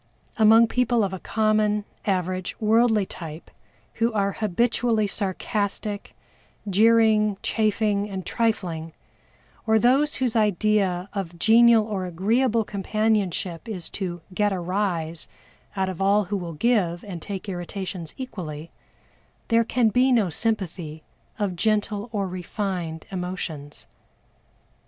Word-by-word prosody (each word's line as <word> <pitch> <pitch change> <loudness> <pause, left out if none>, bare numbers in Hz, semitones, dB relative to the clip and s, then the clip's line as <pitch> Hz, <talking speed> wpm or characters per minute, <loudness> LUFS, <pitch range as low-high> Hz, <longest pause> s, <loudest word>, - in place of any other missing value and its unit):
Among 225 +1 +7
people 240 -1 +2
of 190 -1 -1
a 190 - -4
common, 215 -1 +1 0.2
average, 185 -1 -1
worldly 220 -1 +3
type 165 -3 -9 0.5
who 230 +1 +3
are 200 -2 +1
habitually 220 +2 +1
sarcastic, 205 +1 -3 0.5
jeering, 215 0 +4
chaffing, 210 -1 +1
and 190 -2 -5
trifling, 175 -9 -1 0.7
or 220 0 +5
those 270 +7 +3
whose 250 -3 -1
idea 205 -3 +2
of 180 -4 -4
genial 230 +3 +6
or 195 -4 -3
agreeable 225 +7 +1
companionship 200 -2 -1
is 185 -6 -5
to 175 -3 -4
"get 205 +2 +1
a 190 - -2
rise" 175 -3 -2 0.5
out 190 -1 0
of 185 -1 -5
all 200 +2 +4
who 205 +2 -3
will 175 -3 -5
give 180 -2 +1
and 180 -5 -7
take 200 +2 -6
irritations 180 -2 -5
equally, 170 - -7 0.8
there 230 0 +4
can 235 0 +2
be 250 +4 +3
no 215 -8 +3
sympathy 175 -6 -3 0.3
of 200 -4 -1
gentle 210 +2 0
or 200 -3 -1
refined 180 -2 -4
emotions. 180 -6 -5
205 Hz, 120 wpm, -24 LUFS, 180-220 Hz, 0.8 s, Among